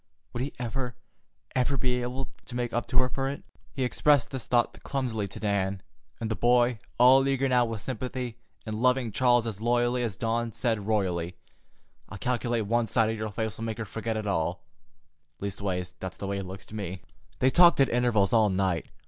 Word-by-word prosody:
Would 120 Hz, -, -3 dB
he 140 Hz, -, -2 dB
ever, 125 Hz, 0 st, -3 dB, 0.6 s
ever, 130 Hz, +2 st, +2 dB
be 125 Hz, -1 st, +1 dB
able 125 Hz, +2 st, -3 dB, 0.2 s
to 120 Hz, -, -8 dB
make 120 Hz, -1 st, -2 dB
up 120 Hz, -, -1 dB
to 125 Hz, -, -3 dB
her 130 Hz, 0 st, +5 dB
for 135 Hz, +1 st, -2 dB
it? 140 Hz, -, -6 dB, 0.3 s
He 135 Hz, -, -2 dB
expressed 140 Hz, 0 st, +3 dB
this 130 Hz, -3 st, -4 dB
thought 120 Hz, -1 st, +1 dB
clumsily 120 Hz, -7 st, -2 dB
to 95 Hz, -, -9 dB
Dan, 100 Hz, -2 st, -1 dB, 0.4 s
and 115 Hz, -1 st, -3 dB
the -, -, 0 dB
boy, 120 Hz, +1 st, +3 dB, 0.2 s
all 130 Hz, +2 st, +7 dB
eager 135 Hz, 0 st, +1 dB
now 125 Hz, -2 st, +4 dB
with 115 Hz, -2 st, -4 dB
sympathy, 125 Hz, -1 st, -4 dB, 0.3 s
and 110 Hz, 0 st, -4 dB
loving 125 Hz, -2 st, +2 dB
Charles 120 Hz, +2 st, +3 dB
as 110 Hz, -2 st, -4 dB
loyally 120 Hz, +1 st, +2 dB
as 115 Hz, -6 st, -2 dB
Dawn, 115 Hz, 0 st, -1 dB
said 110 Hz, -4 st, -1 dB
royally: 90 Hz, -5 st, 0 dB, 0.7 s
"I 105 Hz, -, -7 dB
calculate 120 Hz, 0 st, 0 dB
one 115 Hz, +2 st, +1 dB
sight 110 Hz, +1 st, +2 dB
of -, -, -2 dB
your 110 Hz, 0 st, -3 dB
face'll 110 Hz, +1 st, -3 dB
make 110 Hz, -1 st, -3 dB
her 115 Hz, -, -4 dB
forget 110 Hz, +1 st, -3 dB
it 110 Hz, -, -3 dB
all. 90 Hz, -2 st, -1 dB, 0.8 s
Leastways, 95 Hz, -3 st, -3 dB
that's 95 Hz, -1 st, -6 dB
the -, -, -5 dB
way 100 Hz, 0 st, -2 dB
it 95 Hz, -, -5 dB
looks 95 Hz, +1 st, -8 dB
to 110 Hz, -, -11 dB
me." 95 Hz, -3 st, -5 dB, 0.3 s
They 130 Hz, 0 st, +3 dB
talked 175 Hz, 0 st, +6 dB
at 135 Hz, -, +6 dB
intervals 120 Hz, -5 st, +2 dB
all 110 Hz, -2 st, +5 dB
night. 95 Hz, -3 st, 0 dB
115 Hz, 200 wpm, -28 LUFS, 100-125 Hz, 0.8 s, all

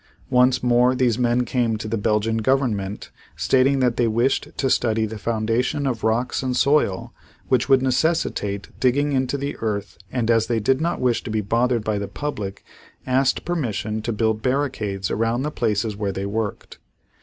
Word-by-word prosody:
Once 125 Hz, 0 st, +3 dB
more 125 Hz, +1 st, +4 dB
these 125 Hz, -2 st, +1 dB
men 125 Hz, 0 st, +2 dB
came 120 Hz, -4 st, 0 dB
to 110 Hz, -, -6 dB
the 110 Hz, -, -1 dB
Belgian 110 Hz, +1 st, 0 dB
Government 110 Hz, -5 st, -1 dB, 0.2 s
stating 135 Hz, +1 st, +2 dB
that 125 Hz, -2 st, +1 dB
they 120 Hz, -, +2 dB
wished 120 Hz, +4 st, +1 dB
to 135 Hz, -, +1 dB
study 110 Hz, -3 st, +1 dB
the 110 Hz, 0 st, -6 dB
formation 115 Hz, +5 st, -1 dB
of 120 Hz, -4 st, -2 dB
rocks 115 Hz, +3 st, 0 dB
and 130 Hz, -1 st, -1 dB
soil 140 Hz, -9 st, +1 dB, 0.4 s
which 125 Hz, -3 st, +2 dB
would 130 Hz, -1 st, +5 dB
necessitate 125 Hz, -, 0 dB
digging 140 Hz, +3 st, +2 dB
into 130 Hz, 0 st, 0 dB
the 140 Hz, +1 st, -4 dB
earth 105 Hz, -2 st, -4 dB
and 120 Hz, -2 st, 0 dB
as 115 Hz, -1 st, +3 dB
they 115 Hz, -1 st, 0 dB
did 130 Hz, +6 st, +1 dB
not 170 Hz, +1 st, -1 dB
wish 125 Hz, -2 st, +1 dB
to -, -, -6 dB
be 110 Hz, 0 st, 0 dB
bothered 115 Hz, +3 st, +1 dB
by 105 Hz, -1 st, -1 dB
the 100 Hz, -, -4 dB
public, 105 Hz, -4 st, -5 dB, 0.4 s
asked 130 Hz, +1 st, +1 dB
permission 110 Hz, -10 st, -2 dB
to 120 Hz, -, -3 dB
build 110 Hz, 0 st, 0 dB
barricades 110 Hz, -, -1 dB
around 115 Hz, +3 st, 0 dB
the 150 Hz, -, -2 dB
places 110 Hz, -4 st, -1 dB
where 100 Hz, -1 st, -2 dB
they 95 Hz, +1 st, -4 dB
worked. 105 Hz, +1 st, -4 dB
120 Hz, 180 wpm, -22 LUFS, 110-130 Hz, 0.4 s, would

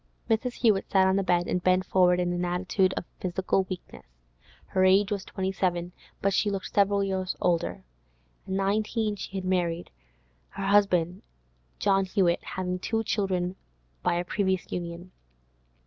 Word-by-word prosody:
Mrs. 235 Hz, +3 st, +1 dB
Hewett 215 Hz, -6 st, +2 dB
sat 190 Hz, -1 st, +4 dB
on 190 Hz, -, +3 dB
the 195 Hz, -, +2 dB
bed, 175 Hz, -2 st, +1 dB
and 180 Hz, -, 0 dB
bent 185 Hz, +1 st, +3 dB
forward 180 Hz, -1 st, +4 dB
in 175 Hz, 0 st, 0 dB
an 175 Hz, 0 st, -1 dB
attitude 185 Hz, +2 st, +1 dB
of -, -, -3 dB
physical 185 Hz, +1 st, 0 dB
weakness. 185 Hz, -, -8 dB, 0.6 s
Her 185 Hz, -, +1 dB
age 195 Hz, +2 st, +4 dB
was 200 Hz, -2 st, -1 dB
twenty 190 Hz, -2 st, -3 dB
seven, 175 Hz, -2 st, -1 dB, 0.3 s
but 195 Hz, 0 st, +2 dB
she 205 Hz, -, +2 dB
looked 195 Hz, -1 st, -4 dB
several 200 Hz, 0 st, +3 dB
years 190 Hz, -1 st, -2 dB
older. 170 Hz, -1 st, 0 dB, 0.6 s
At 190 Hz, -, -3 dB
nineteen 210 Hz, +2 st, 0 dB
she 195 Hz, 0 st, -6 dB
had 185 Hz, -, -4 dB
married; 175 Hz, -2 st, -1 dB, 0.6 s
her 195 Hz, -, -5 dB
husband, 190 Hz, -3 st, +3 dB, 0.6 s
John 195 Hz, -, +2 dB
Hewett, 185 Hz, -3 st, +1 dB
having 180 Hz, -1 st, -3 dB
two 225 Hz, +4 st, -1 dB
children 190 Hz, -3 st, -1 dB, 0.4 s
by -, -, +1 dB
a 175 Hz, +1 st, -1 dB
previous 190 Hz, -1 st, -1 dB
union. 175 Hz, +1 st, -5 dB
190 Hz, 160 wpm, -27 LUFS, 180-195 Hz, 0.6 s, sat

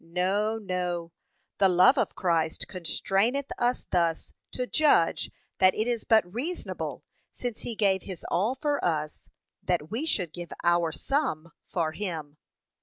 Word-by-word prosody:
No, 190 Hz, +6 st, 0 dB
no; 180 Hz, -4 st, -3 dB, 0.5 s
'the 195 Hz, -1 st, +5 dB
love 180 Hz, +9 st, +6 dB
of 260 Hz, -, 0 dB
Christ 165 Hz, -4 st, 0 dB
constraineth 195 Hz, -, 0 dB
us' 245 Hz, +1 st, +1 dB
thus 170 Hz, -2 st, 0 dB, 0.2 s
to 250 Hz, -, -2 dB
judge 290 Hz, -, +3 dB, 0.3 s
that 185 Hz, 0 st, +5 dB
it 215 Hz, -, 0 dB
is 240 Hz, -2 st, -1 dB
but 220 Hz, -5 st, +3 dB
reasonable, 315 Hz, +10 st, -4 dB, 0.3 s
since 245 Hz, -3 st, -4 dB
he 235 Hz, -, -3 dB
gave 195 Hz, -3 st, +2 dB
his 185 Hz, -3 st, -8 dB
all 210 Hz, +9 st, +1 dB
for 290 Hz, +1 st, -1 dB
us, 155 Hz, -3 st, -2 dB, 0.3 s
that 175 Hz, -2 st, -1 dB
we 260 Hz, +9 st, -2 dB
should 180 Hz, -, 0 dB
give 175 Hz, -2 st, -7 dB
our 175 Hz, -1 st, +3 dB
some 170 Hz, -, -1 dB, 0.2 s
for 165 Hz, -4 st, -1 dB
him. 160 Hz, -6 st, -5 dB
185 Hz, 145 wpm, -28 LUFS, 170-230 Hz, 0.5 s, love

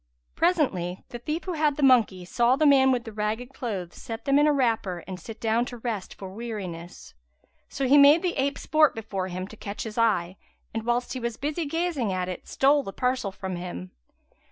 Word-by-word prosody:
Presently 255 Hz, -, 0 dB
the 240 Hz, -, -7 dB
thief 305 Hz, +7 st, -3 dB
who 370 Hz, -, -3 dB
had 300 Hz, -3 st, +1 dB
the 295 Hz, -, -1 dB
monkey 225 Hz, -9 st, +4 dB
saw 240 Hz, +7 st, +3 dB
the 310 Hz, -, +2 dB
man 270 Hz, -2 st, +6 dB
with 245 Hz, -2 st, 0 dB
the 225 Hz, -, -8 dB
ragged 220 Hz, +4 st, -3 dB
clothes 195 Hz, -10 st, -5 dB
set 225 Hz, -1 st, -7 dB
them 275 Hz, +1 st, +4 dB
in 295 Hz, -, +5 dB
a -, -, +5 dB
wrapper 225 Hz, -, 0 dB
and 185 Hz, -1 st, -6 dB
sit 225 Hz, +2 st, -9 dB
down 225 Hz, +1 st, +1 dB
to 245 Hz, -, -7 dB
rest 225 Hz, -5 st, -4 dB
for 190 Hz, -1 st, -9 dB
weariness; 195 Hz, -7 st, -7 dB, 0.6 s
so 270 Hz, -, -2 dB
he 285 Hz, +3 st, +7 dB
made 290 Hz, +5 st, +7 dB
the 360 Hz, -, 0 dB
ape 280 Hz, +1 st, 0 dB
sport 310 Hz, -1 st, +3 dB
before 200 Hz, -4 st, -4 dB
him 185 Hz, +1 st, -5 dB
to 220 Hz, -, -12 dB
catch 205 Hz, -1 st, -6 dB
his 220 Hz, 0 st, -5 dB
eye 185 Hz, -5 st, +1 dB, 0.4 s
and, 225 Hz, +1 st, -4 dB
whilst 240 Hz, +1 st, 0 dB
he 260 Hz, -, -4 dB
was 235 Hz, -2 st, -3 dB
busy 305 Hz, +4 st, -2 dB
gazing 325 Hz, -, -1 dB
at 185 Hz, -1 st, -1 dB
it, 185 Hz, -, -7 dB
stole 285 Hz, +2 st, +3 dB
the 195 Hz, -, -6 dB
parcel 250 Hz, -2 st, -1 dB
from 190 Hz, -1 st, -5 dB
him. 175 Hz, -, -7 dB
235 Hz, 210 wpm, -26 LUFS, 195-275 Hz, 0.6 s, he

